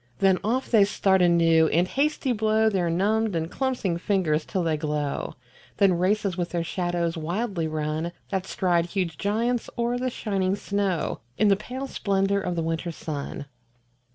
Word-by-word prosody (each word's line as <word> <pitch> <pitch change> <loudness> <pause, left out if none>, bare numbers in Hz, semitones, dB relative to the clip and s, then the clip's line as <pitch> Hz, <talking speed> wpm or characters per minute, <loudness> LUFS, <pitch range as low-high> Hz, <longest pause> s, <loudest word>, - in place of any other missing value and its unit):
Then 190 +1 +3
off 245 +5 -1
they 220 -4 +6
start 195 -1 +2
anew 165 -2 +5
and 175 +3 +2
hasty 280 +2 0
blow 220 0 +2
Their 180 -4 0
numbed 205 +4 +1
and 165 0 -2
clumpsing 245 -10 -1
fingers 170 -6 +1
till 185 - -2
they 160 -2 +1
glow; 150 -2 -2 0.4
Then 195 -2 +4
races 190 +2 +1
with 175 -1 -2
their 170 -1 -1
shadows 175 -1 -1
wildly 175 +1 -2
run 155 +2 -2 0.2
That 190 -1 -2
stride 175 -2 +1
huge 175 -5 -2
giants 230 +4 0
o'er 240 +1 0
the 255 0 0
shining 195 -5 -1
snow 200 -6 -1 0.2
In 210 - +4
the 195 - +5
pale 255 +6 -6
splendour 200 -5 0
of 180 -2 -2
the 165 - -1
winter 165 +1 -2
sun. 145 -3 -5
185 Hz, 165 wpm, -25 LUFS, 165-210 Hz, 0.4 s, they